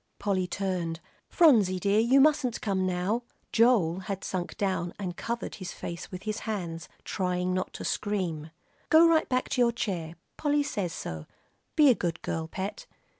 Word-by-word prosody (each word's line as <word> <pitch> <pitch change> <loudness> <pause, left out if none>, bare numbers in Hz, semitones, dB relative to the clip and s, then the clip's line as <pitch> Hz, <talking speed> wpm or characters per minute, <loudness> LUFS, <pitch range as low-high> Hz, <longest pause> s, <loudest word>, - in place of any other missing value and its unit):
Polly 195 -3 0
turned. 175 -3 -2 0.3
"Phronsie 215 - +5
dear, 200 +3 +2
you 245 +5 +5
mustn't 270 -4 +3
come 190 -2 0
now." 185 +6 0 0.3
Joel 220 -8 +4
had 190 0 -5
sunk 180 -2 -4
down 185 -4 -1
and 185 -3 -4
covered 235 +4 -4
his 185 - -5
face 170 0 -6
with 185 0 -8
his 215 0 -3
hands, 175 -6 -4 0.2
trying 180 -1 -1
not 185 0 -2
to - - -6
scream. 175 -7 -2 0.4
"Go 325 +2 +7
right 325 -1 +3
back 255 0 +1
to 265 -2 +1
your 235 -1 +5
chair, 175 -8 -3 0.2
Polly 295 -1 +2
says 195 -10 -2
so. 80 - -6 0.5
Be 295 -3 +7
a - - +6
good 170 -6 -2
girl, 160 0 -2
Pet." 195 - -5
195 Hz, 170 wpm, -28 LUFS, 180-235 Hz, 0.5 s, Go